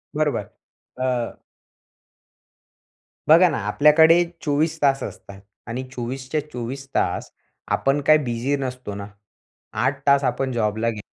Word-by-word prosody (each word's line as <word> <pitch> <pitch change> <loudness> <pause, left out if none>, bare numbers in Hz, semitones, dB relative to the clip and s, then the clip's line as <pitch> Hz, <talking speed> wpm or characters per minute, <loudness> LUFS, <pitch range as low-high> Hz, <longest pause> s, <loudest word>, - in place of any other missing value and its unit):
बरोबर, - - -1 0.5
अ 125 -2 -2 1.9
बघा 170 +4 +7
ना, 150 - -2
आपल्याकडे 160 +8 +5 0.2
24 155 +2 0
तास 135 -1 +2
असतात 100 0 -9 0.3
आणि 120 +3 -4
24च्या, 130 +4 -3
24 130 +3 -6
तास - - -1 0.4
आपण 135 +2 +1
काय 155 +2 +6
बिझी 130 0 -1
नसतो 125 -5 -5
ना. 100 0 -6 0.7
8 135 0 0
तास 140 0 +5
आपण 130 +1 -1
जॉबला 110 -1 0
गे 110 -2 -5
135 Hz, 120 wpm, -22 LUFS, 120-145 Hz, 1.9 s, बघा